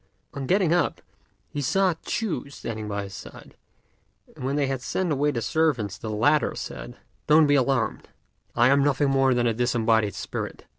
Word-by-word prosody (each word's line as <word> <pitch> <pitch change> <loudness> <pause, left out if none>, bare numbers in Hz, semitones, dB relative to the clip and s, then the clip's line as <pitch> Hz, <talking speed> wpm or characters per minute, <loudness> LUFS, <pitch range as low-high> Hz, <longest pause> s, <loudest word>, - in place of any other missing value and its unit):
On 135 -2 -5
getting 185 -3 +3
up, 175 - +1 0.5
he 145 - -5
saw 185 +6 +2
Ch'u 205 -10 -3
standing 110 -6 -6
by 100 -1 -3
his 100 -1 -9
side; - - -11 0.8
and - - -9
when 135 +2 -1
they 145 -1 +1
had 135 -1 -2
sent 180 +5 -2
away 145 +1 +1
the 120 -6 -2
servants 125 -9 0
the 110 - -6
latter 140 +8 +2
said, - - -7 0.3
"Don't 155 +1 +6
be 145 - +3
alarmed: 135 -1 0 0.5
I 120 +1 +5
am 140 +1 +4
nothing 145 0 +2
more 135 -1 +3
than 120 0 +1
a 115 - +2
disembodied 115 -4 +1
spirit. - - -6
135 Hz, 180 wpm, -25 LUFS, 115-150 Hz, 0.8 s, Don't